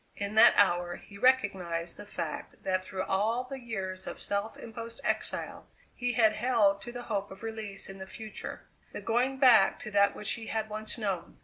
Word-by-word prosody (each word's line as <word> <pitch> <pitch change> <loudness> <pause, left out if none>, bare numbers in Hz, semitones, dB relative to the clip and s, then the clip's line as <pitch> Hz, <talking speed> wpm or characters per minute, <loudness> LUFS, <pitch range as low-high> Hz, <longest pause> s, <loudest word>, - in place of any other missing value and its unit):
In 200 0 -3
that 220 - +8
hour 175 -3 +3
he 200 - -13
recognized 190 -9 +1
the 205 - -10
fact 170 -6 -6
that 185 -1 0
through 185 0 -4
all 220 +7 +1
the 265 +1 -7
years 190 -6 -5
of - - -6
self 205 +2 -2
imposed 230 0 -8
exile - - -2 0.3
he 245 0 -1
had 220 -2 +4
held 215 -5 +2
to 240 - -7
the 245 0 -7
hope 205 -3 -2
of 190 +3 -11
release 220 -3 -3
in 195 0 -9
the 190 - -7
future: 215 +2 -7 0.3
the - - -5
going 250 +4 +1
back 250 -7 +6
to 215 - -6
that 200 0 +4
which 210 - 0
he 225 -2 -4
had 220 -1 -2
once 215 +2 -2
known. 195 -6 -3
210 Hz, 195 wpm, -30 LUFS, 195-230 Hz, 0.3 s, that